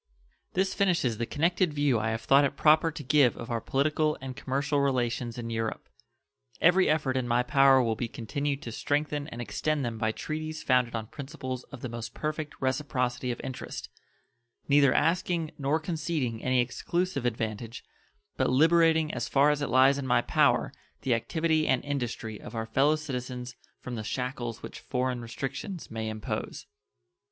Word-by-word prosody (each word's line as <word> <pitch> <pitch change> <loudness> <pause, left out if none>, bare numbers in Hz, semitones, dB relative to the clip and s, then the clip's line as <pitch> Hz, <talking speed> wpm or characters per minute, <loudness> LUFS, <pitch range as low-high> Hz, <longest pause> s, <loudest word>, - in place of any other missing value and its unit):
This 190 +1 +1
finishes 170 - +1
the 115 - -1
connected 170 +1 +1
view 145 -5 +2
I 110 +1 -1
have 110 0 -2
thought 140 +4 +5
it 140 0 -1
proper 155 +1 +5
to 150 -1 -7
give 140 -2 +4
of 115 - -7
our 115 -1 -1
political 150 +4 +1
and 130 -1 -7
commercial 140 +3 -1
relations 125 -3 0
in 115 -1 -5
Europe. 115 -1 -3 0.7
Every 180 +3 +5
effort 150 -4 +1
in 130 -2 0
my 120 +1 +2
power 135 -1 +5
will 115 -2 0
be 120 - -3
continued 140 +5 -3
to 115 - -6
strengthen 145 +3 -1
and 120 - -8
extend 145 +4 -1
them 115 -2 -4
by 110 0 +1
treaties 155 +5 -5
founded 125 -2 +2
on 110 -1 -3
principles 130 -1 -6
of 140 -4 -11
the - - -3
most 115 -1 -7
perfect 155 0 -3
reciprocity 130 -2 -1
of 120 - -3
interest, 130 - -6 0.8
neither 140 -2 +5
asking 165 +1 +1
nor 140 +3 +1
conceding 155 -8 -2
any 130 -1 +3
exclusive 170 +5 -2
advantage, 115 -1 -3 0.5
but - - +2
liberating 160 +2 +4
as - - -3
far 145 +2 +4
as 150 0 -1
it 145 - -1
lies 135 +2 +5
in 135 - -4
my 125 - +3
power - - +2 0.3
the 130 -3 +1
activity 160 +6 +1
and 130 - +1
industry 120 -6 -3
of 115 - -9
our 110 0 -2
fellow 140 +6 +3
citizens 125 -4 -5 0.2
from 125 - -7
the 110 -2 -4
shackles 125 -1 -4
which - - -8
foreign 125 -1 -2
restrictions 135 - -5
may 110 -1 -3
impose. 110 -1 -5
135 Hz, 170 wpm, -28 LUFS, 120-150 Hz, 0.8 s, thought